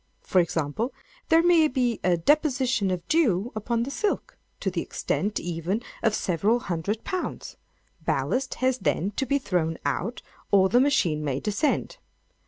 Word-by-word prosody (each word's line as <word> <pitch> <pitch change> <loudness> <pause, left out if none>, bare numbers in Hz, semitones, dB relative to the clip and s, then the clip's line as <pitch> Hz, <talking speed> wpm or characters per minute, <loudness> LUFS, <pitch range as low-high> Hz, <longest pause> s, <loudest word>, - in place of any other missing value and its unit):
For 185 - +3
example, 170 - -2 0.3
there 330 +1 +5
may 340 -3 +5
be 250 -5 0
a 175 -1 +3
deposition 260 - +2
of 180 -2 -3
dew 245 - +2
upon 230 +2 -1
the 270 - -4
silk, 415 +7 -2 0.2
to - - -1
the - - -2
extent, 205 +1 -2
even, 175 +6 -2 0.2
of 220 -2 +2
several 195 +6 +1
hundred 190 +5 -3
pounds; 370 -1 -4 0.5
ballast 260 +1 -1
has 255 0 +1
then 190 +5 0
to 270 +6 -2
be 280 - +2
thrown 170 - -1
out, 225 +7 -2 0.3
or 190 -1 +5
the 245 - +4
machine 170 - +2
may 140 -2 -1
descend. 215 - -1
220 Hz, 155 wpm, -26 LUFS, 180-265 Hz, 0.5 s, there